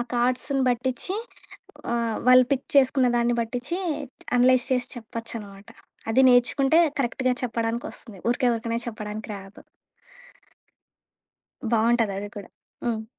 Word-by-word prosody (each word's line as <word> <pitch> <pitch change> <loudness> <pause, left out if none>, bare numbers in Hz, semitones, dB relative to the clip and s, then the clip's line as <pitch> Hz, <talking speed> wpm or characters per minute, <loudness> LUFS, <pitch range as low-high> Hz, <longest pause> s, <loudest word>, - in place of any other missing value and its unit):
ఆ - - +1
కార్డ్స్‌ని 255 +3 +1
బట్టిచి 255 +9 -1 0.8
ఆహ్, 230 -2 -1
వాళ్ళు 255 0 +8
పిక్ 270 -1 -1
చేసుకున్న 265 -1 +4
దాన్ని 240 0 +2
బట్టిచి 245 +9 -3 0.6
అనలైజ్ 250 0 +4
చేసి 250 -1 +1
చెప్పొచ్చనమాట. 220 -3 -8 0.4
అది 250 - +4
నేర్చుకుంటే 265 +5 +4 0.2
కరెక్ట్‌గా 255 0 0
చెప్పడానికొస్తుంది. 230 -3 -4
ఊరికే 245 0 +1
ఊరికనే 230 0 -2
చెప్పడానికి 215 -1 -6
రాదు. 195 +1 -12 2.1
బావుంటది 230 -2 +2
అది 205 +1 -5
కూడా. 200 -2 -8 0.4
హ్మ్. 220 -2 -2
240 Hz, 110 wpm, -25 LUFS, 225-255 Hz, 2.1 s, వాళ్ళు